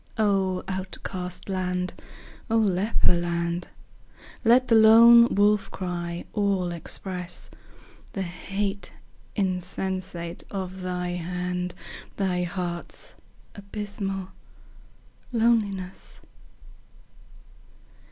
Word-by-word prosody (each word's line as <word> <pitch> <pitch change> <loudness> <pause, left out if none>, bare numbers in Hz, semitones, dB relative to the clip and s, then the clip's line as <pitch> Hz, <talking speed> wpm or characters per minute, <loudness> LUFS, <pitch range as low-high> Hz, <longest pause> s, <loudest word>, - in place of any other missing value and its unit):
O 195 -3 +2
outcast 185 -1 -5
land! 180 -1 -1 0.6
O 225 - +3
leper 205 -1 +3
land! 170 0 -1 0.8
Let 245 +2 +5
the 235 - +3
lone 230 +2 +9
wolf 205 0 +3
cry 175 -2 -4
all 195 -4 +1
express 180 +1 -5 0.6
The 195 - -2
hate 195 +2 -3 0.4
insensate 185 -2 -2
of 190 -1 -5
thy 180 -1 -2
hand, 180 +1 -3 0.4
Thy 185 -3 +1
heart's 175 -1 -4 0.4
abysmal 200 -2 -4 1.0
loneliness. 215 -6 0
185 Hz, 75 wpm, -26 LUFS, 180-200 Hz, 1.0 s, lone